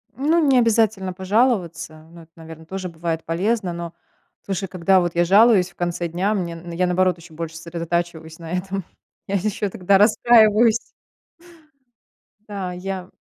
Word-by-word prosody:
Ну, 310 +4 +2
не 265 -2 +4
обязательно 220 -5 +2
пожаловаться, 185 -6 -1
но 170 -1 -13
это, 165 - -23
наверно, 160 -1 -12
тоже 185 +1 -6
бывает 165 -1 -4
полезно, 185 +2 -1
но 170 0 -6 0.5
слушай, 195 0 -3
когда 185 +1 +2
вот 175 -1 -2
я 175 - +3
жалуюсь 200 0 +5
в 175 - -24
конце 175 0 -2
дня, 185 +6 -1
мне 175 -4 -3
н 170 +1 -9
я, 180 +2 0
наоборот, 185 0 +1
ещё 170 -1 -15
больше 165 0 -6
сосредотачиваюсь 170 -1 -4
на 165 0 -9
этом, 190 +1 -3 0.4
я 200 - -2
ещё 205 +1 -1
тогда 190 +2 +2
расстраиваюсь. 220 +1 +5 1.7
Да, 190 -3 -5
я 185 0 -6
180 Hz, 155 wpm, -21 LUFS, 170-205 Hz, 1.7 s, жалуюсь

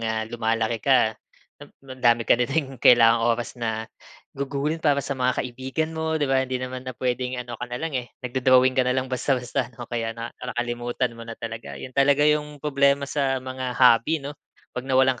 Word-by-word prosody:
ah, 110 -1 -1
lumalaki 115 -1 -1
ka, 125 -4 +3 0.5
ang 130 -1 -13
dami 120 -2 +4
ka 120 - +3
na 120 - +1
ding 135 -3 -2
kailangang 115 -1 +6 0.2
oras 120 - -5
na 115 -2 -3 0.5
gugulin 140 +3 -2
para 145 -3 +2
sa 140 - -2
mga 130 -1 0
kaibigan 130 +6 -3
mo 160 0 -1
'di 150 - 0
ba? 135 -1 +2
Hindi 130 -1 -2
naman 130 0 -6
na 130 - -7
puwedeng 125 0 -2
ano 120 -1 -6
ka 120 - -4
nalang, 150 +7 -4
eh, 120 - -13 0.2
nag-do-drawing 130 0 +4
ka 130 - +2
nalang 130 +1 +1
basta-basta 130 0 -1
'no, 120 - -7
kaya 115 -1 -4
na 115 +1 -6
nakalimutan 120 0 -2
mo 115 - -12
na 115 -1 -8
talaga. 115 -11 -7
'Yon 130 - -9
talaga 140 +2 +4
yung 150 0 +1
problema 140 -1 +2
sa 135 -2 -1
mga 130 -1 -4
hobby 130 +4 +4
'no, 145 - -4 0.4
'pag 125 +2 -6
nawalan 130 -1 +3
130 Hz, 190 wpm, -24 LUFS, 120-140 Hz, 0.5 s, kailangang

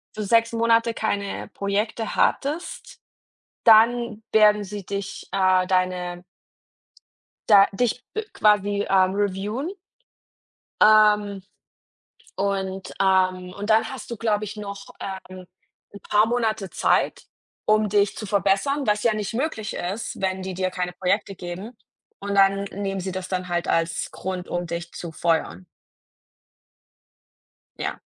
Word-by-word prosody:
für 215 - -3
6 230 +2 +3
Monate 230 0 +3
keine 200 -3 -3
Projekte 205 +3 -2
hattest, 300 +6 -1 0.7
dann 230 0 +5
werden 210 -1 +5
sie 200 -1 -7
dich, 200 -1 -5
äh, 185 -1 +3
deine 180 -1 -1 1.3
da 200 -2 +8
dich 245 +3 -1
b 435 - -1
quasi, 205 -1 +2
ähm, 190 0 +3
reviewen. 205 - -2 1.1
Ähm, 210 -2 +5 0.9
und 195 -1 -2
ähm, 185 -1 +2
und 205 +2 -4
dann 220 +1 +4
hast 265 -2 -8
du, 235 - -4
glaube 215 -1 0
ich 205 +1 -7
noch, 200 -1 -7
ähm, 185 -1 -7 0.5
'n 200 - -11
paar 210 +1 +4
Monate 220 -5 -1
Zeit, - - +1 0.4
um 215 0 +3
dich 205 0 +2
zu 215 - -6
verbessern, 205 +8 +1
was 210 0 +1
ja 230 -2 +3
nicht 215 +1 -4
möglich 245 -5 -2
ist, 195 +5 -4
wenn 190 0 -1
die 190 0 -5
dir 185 0 -1
keine 180 -1 -3
Projekte 195 +2 -1
geben, 185 +7 -8 0.4
und 200 0 -4
dann 195 0 +4
nehmen 195 -1 -4
sie 185 0 -4
das 185 -1 -5
dann 185 -1 -3
halt 175 0 -2
als 165 0 0
Grund, 185 -1 -5
um 175 0 -2
dich 170 +1 -5
zu 170 -2 -7
feuern. 160 - -1 2.1
Ja. - - -3
200 Hz, 130 wpm, -24 LUFS, 185-215 Hz, 2.1 s, da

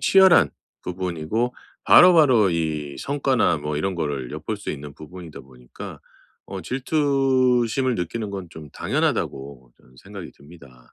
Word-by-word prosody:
치열한 190 - +5 0.3
부분이고 90 +6 -3 0.3
바로바로 145 - +6
이 75 -4 -3
성과나 135 - +1
뭐 75 0 -4
이런 95 +6 -1
거를 70 -7 -3
엿볼 75 +8 -4
수 100 - -6
있는 70 -1 -8
부분이다 80 +1 -11
보니까 60 -2 -12 0.5
어 95 - -6
질투심을 130 - +1
느끼는 105 +5 -4
건 95 -3 -6
좀 75 -4 -11
당연하다고 65 -3 -3
저는 65 - -24
생각이 - - -10
듭니다. 70 -5 -18
90 Hz, 300 characters per minute, -23 LUFS, -, 0.5 s, 바로바로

